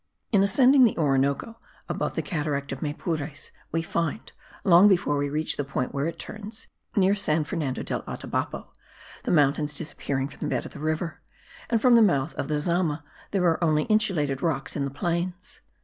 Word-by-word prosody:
In 200 Hz, -4 st, +4 dB
ascending 255 Hz, +7 st, +5 dB
the 235 Hz, -, +3 dB
Orinoco, 140 Hz, -, +1 dB, 0.3 s
above -, -, -2 dB
the -, -, -1 dB
cataract 145 Hz, -4 st, -2 dB
of 135 Hz, -, -5 dB
Maypures, 150 Hz, 0 st, -4 dB, 0.2 s
we 165 Hz, 0 st, 0 dB
find, 170 Hz, +4 st, -2 dB, 0.3 s
long 180 Hz, +1 st, +7 dB
before 175 Hz, -7 st, +3 dB
we 145 Hz, 0 st, 0 dB
reach 155 Hz, +2 st, 0 dB
the 145 Hz, -, 0 dB
point 135 Hz, -2 st, -3 dB
where 140 Hz, +2 st, -1 dB
it 165 Hz, 0 st, -5 dB
turns, 215 Hz, +3 st, -8 dB, 0.3 s
near 195 Hz, -1 st, +4 dB
San 165 Hz, -6 st, +1 dB
Fernando 150 Hz, -4 st, -3 dB
del -, -, -3 dB
Atabapo, -, -, -4 dB, 0.6 s
the -, -, -1 dB
mountains 150 Hz, -1 st, +2 dB
disappearing 140 Hz, -3 st, -3 dB
from -, -, -14 dB
the -, -, -1 dB
bed -, -, -2 dB
of -, -, -8 dB
the -, -, -9 dB
river, 155 Hz, +2 st, -2 dB, 0.5 s
and 230 Hz, -, +2 dB
from 250 Hz, +2 st, +5 dB
the 235 Hz, -, +7 dB
mouth 160 Hz, -8 st, +2 dB
of -, -, -4 dB
the 150 Hz, 0 st, 0 dB
Zama 160 Hz, -1 st, 0 dB, 0.3 s
there 190 Hz, -3 st, +1 dB
are 170 Hz, 0 st, +2 dB
only 155 Hz, -2 st, +3 dB
insulated 155 Hz, -11 st, +1 dB
rocks 150 Hz, -5 st, -1 dB
in 140 Hz, -, -1 dB
the -, -, -2 dB
plains. 175 Hz, +5 st, -3 dB
160 Hz, 185 wpm, -26 LUFS, 145-190 Hz, 0.6 s, long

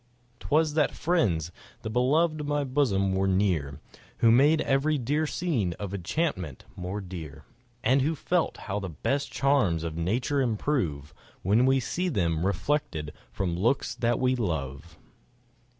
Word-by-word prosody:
'Twas 155 Hz, 0 st, +1 dB
that 150 Hz, -1 st, +1 dB
friends, 95 Hz, -, +1 dB, 0.3 s
the -, -, -4 dB
beloved 150 Hz, +7 st, +2 dB
of 145 Hz, -, -5 dB
my 145 Hz, 0 st, 0 dB
bosom, 120 Hz, -9 st, +1 dB
were 95 Hz, 0 st, +1 dB
near, 90 Hz, -8 st, 0 dB, 0.4 s
Who 115 Hz, -, +5 dB
made 145 Hz, +6 st, +5 dB
every 145 Hz, +3 st, +1 dB
dear 145 Hz, +5 st, 0 dB
scene 130 Hz, -, -1 dB
of 100 Hz, +1 st, -6 dB
enchantment 95 Hz, -, -2 dB
more 95 Hz, +3 st, -4 dB
dear, 85 Hz, -7 st, -8 dB, 0.4 s
And 130 Hz, +4 st, +4 dB
who 155 Hz, +4 st, +1 dB
felt 175 Hz, +3 st, 0 dB
how 100 Hz, 0 st, -2 dB
the 95 Hz, -2 st, -5 dB
best 135 Hz, -, -2 dB
charms 125 Hz, -, +2 dB
of 80 Hz, -2 st, -4 dB
nature 120 Hz, -, 0 dB
improve, 105 Hz, -, -1 dB, 0.3 s
When 110 Hz, +7 st, +3 dB
we 135 Hz, 0 st, +4 dB
see 180 Hz, +8 st, -2 dB
them 85 Hz, -, 0 dB
reflected 95 Hz, -, -1 dB, 0.2 s
from 90 Hz, -3 st, -2 dB
looks 120 Hz, +10 st, +1 dB
that 120 Hz, -1 st, 0 dB
we 130 Hz, 0 st, +2 dB
love. 80 Hz, -, -4 dB
115 Hz, 150 wpm, -27 LUFS, 90-145 Hz, 0.4 s, Who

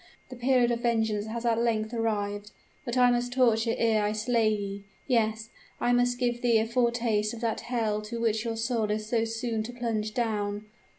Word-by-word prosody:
The 255 Hz, -, -8 dB
period 245 Hz, -1 st, +2 dB
of 235 Hz, -, 0 dB
vengeance 220 Hz, -3 st, 0 dB
has 235 Hz, +2 st, -4 dB
at 230 Hz, -1 st, +2 dB
length 220 Hz, -1 st, 0 dB
arrived! 205 Hz, -3 st, -2 dB, 0.4 s
But 240 Hz, 0 st, -2 dB
I 250 Hz, -1 st, +6 dB
must 245 Hz, 0 st, -1 dB
torture 230 Hz, -3 st, +3 dB
ere 220 Hz, -2 st, +2 dB
I 210 Hz, +1 st, 0 dB
slay 225 Hz, 0 st, +1 dB
ye! 200 Hz, -2 st, -3 dB, 0.2 s
Yes, 220 Hz, -3 st, 0 dB, 0.3 s
I 245 Hz, -, +2 dB
must 245 Hz, 0 st, +2 dB
give 240 Hz, -1 st, -1 dB
thee 235 Hz, -2 st, +4 dB
a 220 Hz, -, +2 dB
foretaste 235 Hz, -2 st, 0 dB
of 230 Hz, -, -10 dB
that 230 Hz, -2 st, -1 dB
hell 225 Hz, -4 st, -1 dB
to 235 Hz, -, -4 dB
which 220 Hz, -1 st, +1 dB
your 230 Hz, -1 st, -3 dB
soul 225 Hz, -2 st, 0 dB
is 215 Hz, 0 st, -1 dB
so 225 Hz, +1 st, +1 dB
soon 225 Hz, 0 st, -2 dB
to 220 Hz, +3 st, -5 dB
plunge 220 Hz, -3 st, -2 dB
down! 210 Hz, -3 st, -1 dB
225 Hz, 195 wpm, -28 LUFS, 215-240 Hz, 0.4 s, I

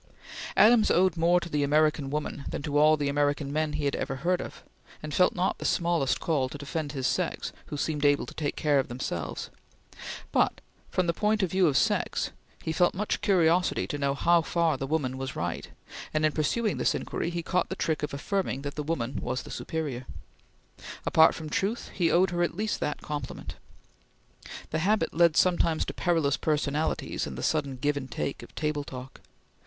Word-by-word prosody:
Adams 220 Hz, 0 st, +6 dB
owed 185 Hz, -1 st, +3 dB
more 170 Hz, +2 st, +4 dB
to 170 Hz, -, -6 dB
the 150 Hz, -3 st, -1 dB
American 150 Hz, 0 st, +2 dB
woman 145 Hz, -1 st, -3 dB
than -, -, -4 dB
to 150 Hz, -2 st, -3 dB
all 155 Hz, +1 st, +6 dB
the 145 Hz, -1 st, -1 dB
American 145 Hz, 0 st, 0 dB
men 155 Hz, 0 st, 0 dB
he 150 Hz, -1 st, -2 dB
ever 135 Hz, -, -2 dB
heard 175 Hz, +7 st, 0 dB
of, -, -, -9 dB, 0.4 s
and 155 Hz, -1 st, -5 dB
felt 180 Hz, -, +3 dB
not 180 Hz, +1 st, 0 dB
the -, -, -6 dB
smallest 165 Hz, -6 st, +1 dB
call 140 Hz, -6 st, 0 dB
to 145 Hz, -, -7 dB
defend 145 Hz, +1 st, -4 dB
his 135 Hz, -3 st, -3 dB
sex -, -, -1 dB
who 150 Hz, -, -5 dB
seemed 150 Hz, 0 st, -1 dB
able 145 Hz, 0 st, +3 dB
to -, -, -10 dB
take 145 Hz, -3 st, -2 dB
care 145 Hz, -2 st, +2 dB
of 135 Hz, -, -1 dB
themselves; 105 Hz, -, -4 dB, 0.8 s
but -, -, +2 dB, 0.3 s
from 185 Hz, -, +1 dB
the 170 Hz, -, +1 dB
point 210 Hz, +2 st, +1 dB
of 180 Hz, -, 0 dB
view 185 Hz, -2 st, +4 dB
of 140 Hz, -4 st, +2 dB
sex -, -, +1 dB, 0.3 s
he 160 Hz, -, -2 dB
felt 175 Hz, +1 st, +3 dB
much 210 Hz, +3 st, -1 dB
curiosity 180 Hz, -2 st, +3 dB
to 145 Hz, -, -4 dB
know 140 Hz, -1 st, +1 dB
how 170 Hz, +3 st, +4 dB
far 165 Hz, -1 st, +1 dB
the 135 Hz, +1 st, -4 dB
woman 135 Hz, -4 st, -1 dB
was 135 Hz, 0 st, -4 dB
right, 85 Hz, -1 st, -3 dB, 0.5 s
and, 155 Hz, 0 st, +3 dB
in 155 Hz, -, +3 dB
pursuing 205 Hz, +9 st, 0 dB
this -, -, +1 dB
inquiry, -, -, -3 dB
he 170 Hz, -1 st, -3 dB
caught 180 Hz, +1 st, 0 dB
the 190 Hz, -, -3 dB
trick 160 Hz, -4 st, -1 dB
of 150 Hz, -, -2 dB
affirming 140 Hz, -2 st, -2 dB
that 145 Hz, 0 st, -4 dB
the 150 Hz, -, -4 dB
woman 135 Hz, -5 st, -2 dB
was 125 Hz, +1 st, -2 dB
the -, -, -10 dB
superior. 145 Hz, -7 st, -4 dB, 1.0 s
Apart 160 Hz, 0 st, +5 dB
from 160 Hz, -, -6 dB
truth, 200 Hz, +9 st, -1 dB
he 170 Hz, -3 st, +2 dB
owed 180 Hz, +2 st, +3 dB
her 175 Hz, 0 st, -1 dB
at 175 Hz, 0 st, 0 dB
least 215 Hz, +1 st, -1 dB
that 150 Hz, -, -2 dB
compliment. 145 Hz, -4 st, -5 dB, 1.2 s
The 160 Hz, -, 0 dB
habit 195 Hz, 0 st, +1 dB
led 170 Hz, -1 st, +4 dB
sometimes 170 Hz, -3 st, +3 dB
to -, -, -5 dB
perilous 165 Hz, -5 st, +1 dB
personalities 150 Hz, 0 st, -1 dB
in 65 Hz, -, -6 dB
the -, -, -5 dB
sudden 140 Hz, -4 st, 0 dB
give 145 Hz, +3 st, 0 dB
and 130 Hz, -2 st, -5 dB
take 120 Hz, +3 st, -3 dB
of -, -, -13 dB
table 150 Hz, -2 st, -1 dB
talk. 130 Hz, -1 st, -9 dB
155 Hz, 200 wpm, -28 LUFS, 140-175 Hz, 1.2 s, Adams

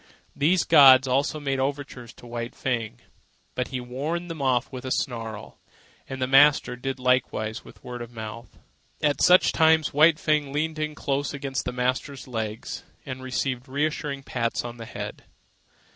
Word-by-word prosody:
These 165 Hz, +4 st, +3 dB
gods 135 Hz, -4 st, +7 dB
also 140 Hz, +4 st, 0 dB
made 135 Hz, -2 st, -2 dB
overtures 135 Hz, -3 st, -4 dB
to -, -, -15 dB
White 120 Hz, 0 st, -6 dB
Fang, 115 Hz, -4 st, -3 dB, 0.5 s
but 125 Hz, -, -2 dB
he 130 Hz, -, -4 dB
warned 150 Hz, +8 st, -4 dB
them 160 Hz, -3 st, -6 dB
off 130 Hz, -2 st, +1 dB
with 130 Hz, -1 st, -7 dB
a 130 Hz, -, -4 dB
snarl, 115 Hz, -5 st, -4 dB, 0.5 s
and 135 Hz, -, -5 dB
the 130 Hz, -, +1 dB
master 135 Hz, -1 st, +5 dB
did 135 Hz, +2 st, -4 dB
likewise 125 Hz, -3 st, 0 dB
with -, -, -16 dB
word 125 Hz, -1 st, -7 dB
of 120 Hz, 0 st, -8 dB
mouth. 110 Hz, 0 st, -9 dB, 0.5 s
At 145 Hz, -1 st, +1 dB
such 180 Hz, +1 st, +6 dB
times 160 Hz, -1 st, +3 dB
White 155 Hz, +2 st, +5 dB
Fang 150 Hz, -3 st, 0 dB
leaned 155 Hz, +2 st, -2 dB
in 155 Hz, 0 st, -3 dB
close 140 Hz, +1 st, -2 dB
against 135 Hz, -1 st, -3 dB
the 125 Hz, -, -2 dB
master's 130 Hz, +3 st, -2 dB
legs 110 Hz, -3 st, -5 dB, 0.2 s
and 130 Hz, 0 st, -6 dB
received 130 Hz, 0 st, -3 dB
reassuring 140 Hz, 0 st, -2 dB
pats 115 Hz, -3 st, -2 dB
on 120 Hz, 0 st, -7 dB
the 115 Hz, -, -8 dB
head. -, -, -7 dB
130 Hz, 165 wpm, -25 LUFS, 125-145 Hz, 0.5 s, gods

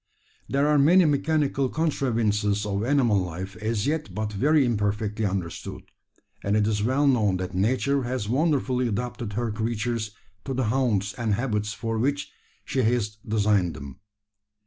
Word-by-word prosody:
There 140 Hz, +2 st, +2 dB
are 150 Hz, -1 st, +4 dB
many 175 Hz, +6 st, +6 dB
mechanical 145 Hz, -2 st, +1 dB
contrivances 110 Hz, -9 st, 0 dB
of 100 Hz, 0 st, -1 dB
animal 120 Hz, -5 st, +3 dB
life 90 Hz, +3 st, -6 dB
as 110 Hz, -1 st, -1 dB
yet 155 Hz, +1 st, -2 dB
but 105 Hz, 0 st, -3 dB
very 145 Hz, +7 st, +3 dB
imperfectly 105 Hz, -1 st, -1 dB
understood; 95 Hz, -4 st, -5 dB, 0.6 s
and 100 Hz, +1 st, +1 dB
it 105 Hz, -, +2 dB
is 105 Hz, -1 st, 0 dB
well 130 Hz, +6 st, +2 dB
known 110 Hz, -9 st, +3 dB
that 90 Hz, 0 st, -5 dB
Nature 130 Hz, +8 st, +1 dB
has 125 Hz, -4 st, -3 dB
wonderfully 130 Hz, -1 st, +1 dB
adapted 120 Hz, 0 st, -3 dB
her 115 Hz, +1 st, -1 dB
creatures 110 Hz, +1 st, -2 dB, 0.4 s
to 135 Hz, -, -3 dB
the 130 Hz, -, 0 dB
haunts 110 Hz, -5 st, +1 dB
and 115 Hz, -4 st, 0 dB
habits 105 Hz, -3 st, -1 dB
for 115 Hz, -1 st, -3 dB
which 140 Hz, +4 st, -1 dB, 0.3 s
she 135 Hz, -2 st, 0 dB
has 110 Hz, -3 st, 0 dB
designed 105 Hz, -5 st, +2 dB
them. 70 Hz, -1 st, -9 dB
115 Hz, 150 wpm, -25 LUFS, 105-135 Hz, 0.6 s, many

